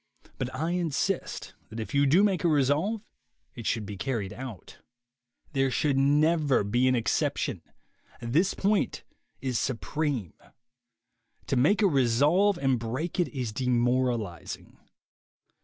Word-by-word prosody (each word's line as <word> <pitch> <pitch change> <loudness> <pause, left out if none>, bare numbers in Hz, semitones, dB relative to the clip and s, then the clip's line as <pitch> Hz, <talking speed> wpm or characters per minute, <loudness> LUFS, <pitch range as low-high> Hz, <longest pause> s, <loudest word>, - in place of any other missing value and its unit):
But 125 - -2
I 160 +5 -1
insist 175 +2 -2 0.2
that 110 - -7
if 110 - -5
you 140 0 +4
do 170 +9 +5
make 195 -4 +1
a - - +4
resolve 155 - +1 0.5
it 115 -4 -6
should 110 -2 0
be 100 0 -7
carried 105 -5 -3
out. 115 -5 -9 0.7
There 135 -1 +2
should 140 +2 +1
be 135 - +3
never 150 0 +3
an 125 +5 +2
excep 140 +5 0
tion. 115 - -2 0.6
This 150 +11 +1
point 205 +1 0 0.4
is 130 -3 -1
supreme. 130 - -2 1.1
To - - -1
make 155 - +3
a - - +6
resolve 145 - +3
and 135 -3 +1
break 130 +11 -3
it 175 - +3
is 125 -6 -4
demoralizing. 120 -6 -1
135 Hz, 135 wpm, -28 LUFS, 120-160 Hz, 1.1 s, a